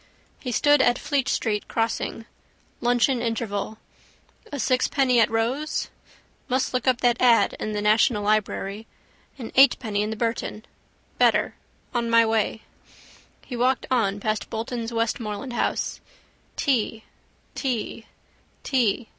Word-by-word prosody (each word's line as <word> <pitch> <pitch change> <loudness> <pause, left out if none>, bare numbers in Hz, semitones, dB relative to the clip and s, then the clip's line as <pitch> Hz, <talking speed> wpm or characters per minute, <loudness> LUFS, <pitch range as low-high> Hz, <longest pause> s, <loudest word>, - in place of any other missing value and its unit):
He 250 - -5
stood 290 +4 +4
at 245 -1 +3
Fleet 285 -3 -1
street 210 -3 -1
crossing. 225 0 -2 0.5
Luncheon 245 +1 +2
interval. 220 -2 -3 0.7
A 285 - -4
sixpenny 255 +1 +2
at 225 - +4
Rowe's? 245 +7 -1 0.6
Must 255 +1 0
look 255 0 -1
up 255 -2 +2
that 240 -1 +2
ad 240 -2 +4
in 215 - -3
the 205 0 -2
national 210 0 +3
library. 210 0 -1 0.5
An 235 -4 -7
eightpenny 230 -6 +4
in 210 - -1
the 220 - -3
Burton. 225 -1 -3 0.5
Better. - - +3 0.4
On 235 -1 -1
my 230 0 +5
way. 220 0 0 0.8
He 250 - -6
walked 250 +1 +1
on 205 -5 +1
past 215 +1 -2
Bolton's 230 +1 -4
Westmoreland 230 +1 -2
house. - - -1 0.5
Tea. 225 -4 0 0.5
Tea. 235 -3 -3 0.6
Tea. 240 -4 +1
230 Hz, 125 wpm, -24 LUFS, 220-255 Hz, 0.8 s, my